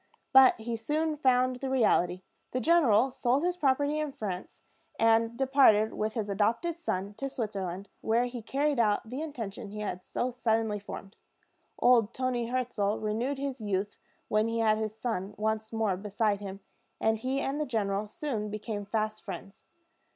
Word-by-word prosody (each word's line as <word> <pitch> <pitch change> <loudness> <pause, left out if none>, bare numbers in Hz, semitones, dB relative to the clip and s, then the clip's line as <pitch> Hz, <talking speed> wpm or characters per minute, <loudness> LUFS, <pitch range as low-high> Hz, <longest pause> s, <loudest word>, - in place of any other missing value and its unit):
But 265 -1 +8
he 230 +1 -3
soon 305 +7 -1
found 255 -3 +2
the 265 +1 -4
reality. 185 -8 +2 0.3
The 255 - +1
general 265 -5 +4
sold 255 +3 +1
his 355 0 +1
property 290 -1 +1
in 305 -2 -2
France, 190 -6 -6 0.4
and 225 +1 +3
departed 260 -5 +4
with 215 0 -2
his 220 -3 -1
adopted 230 - 0
son 200 - -2
to 275 - -2
Switzerland, 200 -7 -4
where 230 +2 +2
he 245 -1 -5
carried 280 +4 0
out 215 -1 +2
the 255 +6 -5
intention 230 -11 -5
he 210 +1 -7
had 185 -3 -4
so 250 +1 -2
suddenly 225 -3 0
formed. 200 0 -9 0.6
Old 235 -3 +4
Toni 250 -2 -1
Hirzel 235 -4 0
renewed 230 +6 -1
his 270 -3 -4
youth 205 -1 -2 0.3
when 215 +1 +2
he 230 0 -1
had 215 -1 +3
his 215 0 -3
son 210 -4 -3
once 220 +1 -1
more 220 -4 0
beside 205 +1 0
him, 195 0 -7 0.4
and 220 0 +1
he 260 +3 -1
and 275 +2 -1
the 300 - -1
general 205 -3 -1
soon 230 -6 -3
became 210 0 -4
fast 215 0 -1
friends. 195 +1 -9
225 Hz, 165 wpm, -29 LUFS, 210-260 Hz, 0.6 s, But